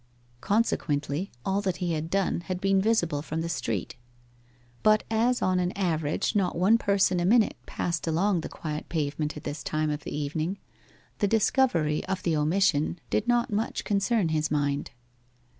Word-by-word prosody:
Consequently 175 -6 0
all 195 +1 +1
that 190 -3 -1
he 175 -2 -1
had 160 +1 -3
done 195 0 +1
had 180 +2 -4
been 195 0 +2
visible 175 -9 +1
from 160 +2 -3
the 165 - -2
street. 115 - -3 0.8
But 215 0 +4
as 235 +3 +2
on 185 -1 +2
an 180 0 0
average 160 -1 -1
not 195 -3 +1
one 205 +6 +4
person 195 -3 +2
a - - 0
minute 220 +2 +4
passed 170 -1 -2
along 175 +3 +1
the - - -6
quiet 155 -1 -6
pavement 150 -1 -2
at - - -9
this 145 +1 -5
time 155 0 -1
of 150 -1 -4
the - - -5
evening, 155 +6 -2 0.6
the 205 - +2
discovery 200 - +2
of 190 0 -3
the 165 -2 +1
omission 155 0 +2
did 215 - 0
not 240 -2 +2
much 215 +2 -1
concern 200 -2 +1
his 155 -1 0
mind. 145 -1 0
175 Hz, 170 wpm, -27 LUFS, 155-200 Hz, 0.8 s, But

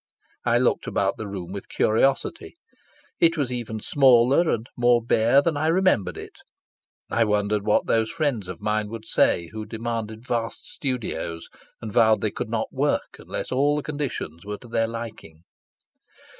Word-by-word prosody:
I - - +3
looked - - +1
about - - 0
the 110 - -5
room 95 -3 -6
with 100 0 -7
curiosity. 135 - +1 0.6
It 165 0 +4
was 140 -4 -1
even 115 -3 -4
smaller 135 +6 +4
and 115 -1 0
more 120 0 +4
bare 120 +4 +3
than 165 -1 +1
I 150 +2 0
remembered 165 - +2
it. - - -10 0.7
I 115 - +3
wondered 105 -1 +1
what 105 - +3
those 110 -1 +1
friends 145 - -1
of 90 +1 -7
mine 105 0 -1
would 110 0 -7
say 85 -5 +2
who 110 0 -5
demanded 115 0 -5
vast 115 -2 -3
studios, 105 - -4 0.3
and 110 -2 -5
vowed 110 -1 +4
they - - 0
could - - -5
not - - -2
work - - -1
unless - - -6
all 140 +3 +2
the 150 - -2
conditions 140 - -4
were 105 0 -5
to 120 - -14
their 115 -1 0
liking. 115 -8 -8
115 Hz, 165 wpm, -24 LUFS, 105-135 Hz, 0.7 s, It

